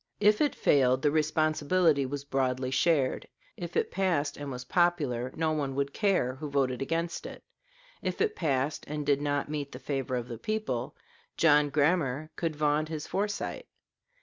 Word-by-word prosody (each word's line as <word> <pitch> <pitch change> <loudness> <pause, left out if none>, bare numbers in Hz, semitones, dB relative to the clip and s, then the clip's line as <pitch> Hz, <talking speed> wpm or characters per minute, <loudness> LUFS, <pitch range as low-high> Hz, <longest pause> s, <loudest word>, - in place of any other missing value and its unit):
If 210 0 +4
it 295 -2 +2
failed, 130 -2 +3
the 145 - +4
responsibility 155 0 +2
was 140 +1 -4
broadly 130 -1 -1
shared; 140 -2 +1 0.3
if 175 -1 -5
it - - 0
passed 175 -6 0
and 145 -1 -6
was 125 -1 -6
popular, 145 -7 +1
no 160 -1 +1
one 140 -4 -2
would 140 0 -1
care 190 - +1
who 150 +1 -5
voted 135 -3 0
against 165 +4 -2
it; - - -10 0.6
if - - -3
it 435 -1 +1
passed 140 -1 0
and 150 0 -4
did 140 0 +2
not 145 -1 0
meet 145 -2 -4
the - - -6
favor 135 0 -3
of 120 -1 -3
the 115 -3 -7
people, 215 - -2 0.4
John 150 -2 +5
Grammar 150 0 +1
could 165 -2 -2
vaunt 150 +1 +1
his 155 -2 -4
foresight. 205 +1 -3
145 Hz, 170 wpm, -29 LUFS, 135-165 Hz, 0.6 s, John